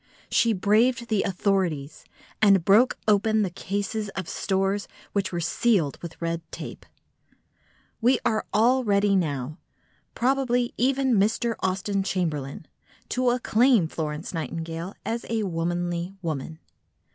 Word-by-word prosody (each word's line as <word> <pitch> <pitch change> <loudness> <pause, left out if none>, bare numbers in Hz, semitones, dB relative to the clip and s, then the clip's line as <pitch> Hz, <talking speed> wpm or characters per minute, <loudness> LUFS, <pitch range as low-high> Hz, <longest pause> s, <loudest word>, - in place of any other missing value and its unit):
She 230 - +3
braved 225 +5 +2
the 215 -3 +2
authorities, 180 -7 -1 0.4
and 195 -5 +5
broke 220 +6 +5
open 215 +1 +3
the 185 - -2
cases 205 +3 -3
of 185 -3 -4
stores 195 +1 -1 0.3
which 195 -2 0
were 175 - -2
sealed 170 - +1
with 170 -2 -8
red 170 0 -2
tape. - - -8 1.1
We 245 +3 +4
are 220 -2 0
all 250 +5 +3
ready 200 -2 +3
now—probably 235 - -2
even 260 -2 +2
Mr. 225 +3 +1
Austen 195 +1 -1
Chamberlain—to 170 - -3
acclaim 245 -4 +3
Florence 155 +1 -4
Nightingale 165 +3 -4
as 230 +1 -2
a 225 -1 0
womanly 175 0 -2
woman. 160 -1 -4
195 Hz, 115 wpm, -25 LUFS, 170-225 Hz, 1.1 s, and